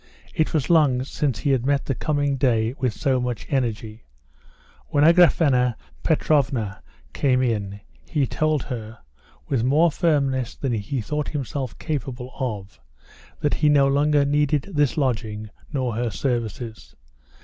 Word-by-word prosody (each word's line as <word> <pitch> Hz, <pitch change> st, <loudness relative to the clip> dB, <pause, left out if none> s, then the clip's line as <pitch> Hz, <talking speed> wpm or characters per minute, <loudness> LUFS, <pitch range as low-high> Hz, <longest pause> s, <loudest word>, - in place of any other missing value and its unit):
It 155 Hz, -, 0 dB
was 155 Hz, -4 st, 0 dB
long 140 Hz, -6 st, +4 dB
since 135 Hz, -2 st, -2 dB
he 140 Hz, -, 0 dB
had 130 Hz, -3 st, +2 dB
met 140 Hz, +1 st, +1 dB
the 135 Hz, -, -1 dB
coming 145 Hz, +1 st, 0 dB
day 120 Hz, -3 st, +1 dB
with 130 Hz, -3 st, +1 dB
so 135 Hz, +2 st, 0 dB
much 125 Hz, -2 st, -3 dB
energy. 115 Hz, -4 st, -2 dB, 0.8 s
When 145 Hz, -, +2 dB
Agraphena 150 Hz, -7 st, +5 dB, 0.3 s
Petrovna 130 Hz, -, +1 dB, 0.3 s
came 130 Hz, -2 st, +2 dB
in, 100 Hz, -4 st, -2 dB, 0.3 s
he 150 Hz, -5 st, +1 dB
told 155 Hz, +1 st, 0 dB
her, 110 Hz, -3 st, -6 dB, 0.5 s
with 120 Hz, -4 st, 0 dB
more 155 Hz, +6 st, +4 dB
firmness 140 Hz, -7 st, 0 dB
than 135 Hz, -4 st, -2 dB
he 115 Hz, +4 st, -2 dB
thought 150 Hz, +7 st, -3 dB
himself 135 Hz, -3 st, -4 dB
capable 130 Hz, -4 st, -4 dB
of, 105 Hz, -7 st, -4 dB, 0.6 s
that 145 Hz, -, +1 dB
he 150 Hz, -, +2 dB
no 140 Hz, -2 st, +5 dB
longer 145 Hz, +1 st, +3 dB
needed 145 Hz, +3 st, +1 dB
this 145 Hz, 0 st, +1 dB
lodging 110 Hz, -6 st, -2 dB, 0.2 s
nor 130 Hz, -5 st, -1 dB
her 120 Hz, +2 st, -1 dB
services. 115 Hz, -1 st, -4 dB
130 Hz, 140 wpm, -23 LUFS, 120-145 Hz, 0.8 s, Agraphena